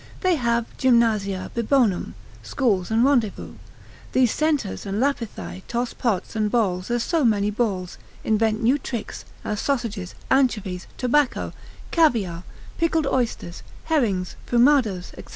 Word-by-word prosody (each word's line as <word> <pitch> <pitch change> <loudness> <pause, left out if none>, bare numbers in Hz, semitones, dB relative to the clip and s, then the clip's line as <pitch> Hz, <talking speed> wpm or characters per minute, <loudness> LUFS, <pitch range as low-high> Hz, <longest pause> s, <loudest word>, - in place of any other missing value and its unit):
They 370 -2 +3
have 235 -5 +1
gymnasia 220 -7 +2
bibonum, 235 -4 +1 0.3
schools 205 -9 0
and 225 +2 +3
rendezvous; 245 -8 +1 0.6
these 255 -3 +4
centaurs 300 -9 0
and 200 +2 -2
Lapithae 215 - -2
toss 240 +1 -2
pots 215 -3 -2
and 215 -1 +1
bowls 190 -5 0
as 240 -1 0
so 330 +1 +1
many 210 -3 +2
balls; 200 -5 -2 0.2
invent 220 +1 +1
new 260 +6 +3
tricks, 240 -4 -6 0.2
as 210 -1 -2
sausages, 225 -9 -2 0.2
anchovies, 210 -9 +1
tobacco, 265 +2 +1 0.4
caviar, 225 - +2 0.4
pickled 325 -2 +2
oysters, 240 -10 -2 0.2
herrings, 215 - 0
fumados, 240 -7 +3
&c. - - -8
230 Hz, 125 wpm, -23 LUFS, 200-260 Hz, 0.6 s, these